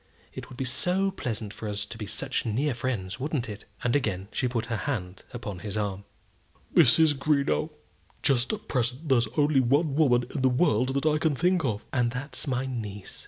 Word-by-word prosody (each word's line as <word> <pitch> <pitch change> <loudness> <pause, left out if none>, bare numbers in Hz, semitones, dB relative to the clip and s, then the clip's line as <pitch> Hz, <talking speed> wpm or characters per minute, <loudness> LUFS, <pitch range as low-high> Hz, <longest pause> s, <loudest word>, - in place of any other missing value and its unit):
It - - -8
would 125 - -11
be 130 - -2
so 180 +10 +1
pleasant 110 - -4
for 110 - -5
us 105 0 -3
to 110 - -9
be 110 -3 -6
such - - -2
near 130 +6 0
friends; 120 -4 -3
wouldn't 140 -3 -2
it?" 105 -2 -8 0.2
And 120 +1 +2
again 100 -8 -1
she 130 - 0
put 120 -2 -1
her 115 - -2
hand 95 -8 -3
upon 105 -6 -6
his 105 +1 -4
arm. 100 -1 -2 0.7
"Mrs. 155 +1 +6
Greenow, 145 +2 +1 0.5
just 130 -3 +3
at 215 -1 -5
present 130 +4 -1
there's 120 -4 +4
only 145 -1 +4
one 140 +4 +2
woman 125 -5 +3
in 140 - -2
the 130 - +4
world 130 -2 +2
that 140 - 0
I 155 -1 +3
can 155 -2 +1
think 180 +3 +2
of." 110 -6 -2
"And 120 -2 +2
that's 130 +4 -5
my 130 0 0
niece." 105 -6 -5
125 Hz, 200 wpm, -27 LUFS, 110-145 Hz, 0.7 s, Mrs